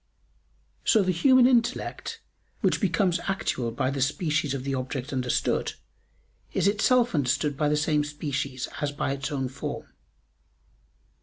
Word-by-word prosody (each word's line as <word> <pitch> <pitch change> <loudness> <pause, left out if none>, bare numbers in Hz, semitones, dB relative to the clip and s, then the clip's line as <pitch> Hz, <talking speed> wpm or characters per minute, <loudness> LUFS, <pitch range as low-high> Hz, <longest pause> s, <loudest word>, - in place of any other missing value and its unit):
So 215 -3 +4
the 185 - +1
human 255 +8 +5
intellect, 240 -1 0 0.4
which - - +2
becomes 180 -1 +2
actual 160 -10 -1
by 120 +3 -1
the 140 -1 -3
species 150 0 0
of 130 - -4
the 135 0 -2
object 130 +1 -3
understood, 125 -2 0 0.8
is - - +2
itself 240 +4 +3
understood 145 0 +1
by 150 +1 +1
the 150 - +2
same 150 0 +2
species 140 -3 -3
as 145 -1 0
by 145 - -2
its 140 +2 -3
own 135 -2 -1
form. 135 +3 -5
150 Hz, 140 wpm, -26 LUFS, 135-185 Hz, 0.8 s, human